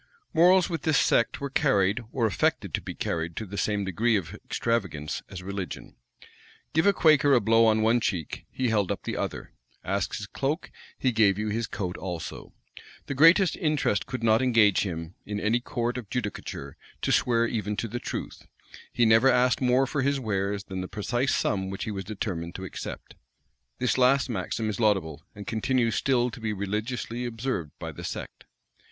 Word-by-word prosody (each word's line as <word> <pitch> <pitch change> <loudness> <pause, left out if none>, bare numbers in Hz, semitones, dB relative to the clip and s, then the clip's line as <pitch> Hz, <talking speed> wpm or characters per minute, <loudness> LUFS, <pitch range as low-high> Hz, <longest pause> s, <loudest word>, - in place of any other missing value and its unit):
Morals 180 +2 +5
with 165 -5 -3
this 155 -2 +2
sect 115 - +2
were 140 -1 -4
carried, 100 -2 +2
or 120 -4 0
affected 110 - 0
to - - 0
be - - -7
carried 80 0 -3
to 110 - -4
the 100 0 -8
same 100 -1 0
degree 110 +5 +1
of 95 -7 -2
extravagance 95 -11 -2
as 90 -1 -8
religion. 95 -4 -6 0.8
Give 160 +5 +3
a - - +7
Quaker 155 -6 +5
a - - +5
blow 115 +1 +4
on 110 0 +3
one 115 +2 +4
cheek, 90 -8 -3
he 130 -2 -1
held 105 -4 +1
up - - -4
the - - -3
other: - - -4 0.3
ask 95 0 -1
his 100 - -5
cloak, 140 - -3 0.3
he 130 - +1
gave 105 -4 +3
you 105 0 -2
his 115 +2 -1
coat 90 -4 -4
also; 90 -3 -6 0.5
the - - -3
greatest 165 +6 +6
interest 150 -10 0
could 125 -2 -5
not 110 +1 +4
engage 115 -6 +4
him, 85 -3 -4
in 105 0 -4
any 110 +4 +2
court 120 -1 -2
of 110 -5 -11
judicature, 110 -5 -5 0.3
to - - +1
swear 115 -1 +3
even 105 -3 -2
to 115 - -2
the 120 +3 -4
truth: - - -6 0.4
he 120 - +2
never 115 +4 +6
asked 125 -1 +3
more 130 +1 +3
for 140 +1 -2
his 140 +1 +1
wares 100 -3 -1
than 95 -2 -5
the 90 - -4
precise 120 +7 -1
sum 95 -2 0
which 95 - -4
he 110 - -3
was 95 -2 -4
determined 90 -5 -4
to 95 - -5
accept. - - -7 0.6
This 125 0 0
last 130 +1 +4
maxim 110 +2 -2
is 105 0 -3
laudable, 95 -9 +1
and 100 0 -8
continues 115 +1 +1
still 125 0 +1
to - - -9
be 110 -1 -2
religiously 110 +4 -3
observed 115 - -3
by - - -6
the - - -10
sect. - - -6
110 Hz, 190 wpm, -27 LUFS, 100-125 Hz, 0.8 s, a